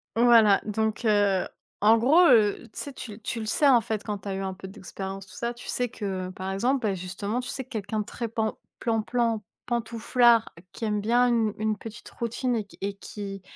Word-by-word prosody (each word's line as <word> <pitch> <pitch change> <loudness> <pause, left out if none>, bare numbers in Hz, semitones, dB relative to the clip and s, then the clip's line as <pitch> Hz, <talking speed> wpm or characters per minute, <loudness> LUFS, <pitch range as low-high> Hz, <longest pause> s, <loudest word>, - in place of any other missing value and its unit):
Voilà. 230 -4 +6
Donc 220 +2 -1
heu, 205 -3 +3 0.3
en 220 +2 +6
gros, 295 +10 +5
heu, 220 -2 +4
tu - - -6
sais 285 - -5
tu 245 - -8
l 210 - -13
tu 230 +2 -3
le 220 - -4
sais, 285 +7 +3
en 250 -4 +6
fait, 220 -2 -3
quand 205 -1 -4
tu 195 - -11
as 195 - -2
eu - - -3
un 190 -1 -3
peu 190 0 -9
d'expérience 195 -1 -7
tout - - -15
ça, 235 0 -2
tu 240 - -12
sais 245 -1 -1
que 190 -5 -4
par 185 +1 -5
exemple, 245 +7 +1
beh, 195 - 0
justement 195 +5 -3
tu 250 +1 -5
sais 265 - -3
quelqu'un 220 -3 -4
de 210 - -2
très 235 - -4
pan 220 -1 -2 0.2
plan 225 -2 0
plan, 230 -2 0 0.2
pantouflard 235 0 +3 0.2
qui 230 - -5
aime 210 -1 0
bien 240 +4 +3
une 225 -3 +2
une 215 -1 0
petite 225 +2 -10
routine 240 +1 -2
et 215 -3 -2
q 200 - -18
et 200 +1 -2
qui 200 -1 -7
220 Hz, 225 wpm, -26 LUFS, 200-235 Hz, 0.3 s, Voilà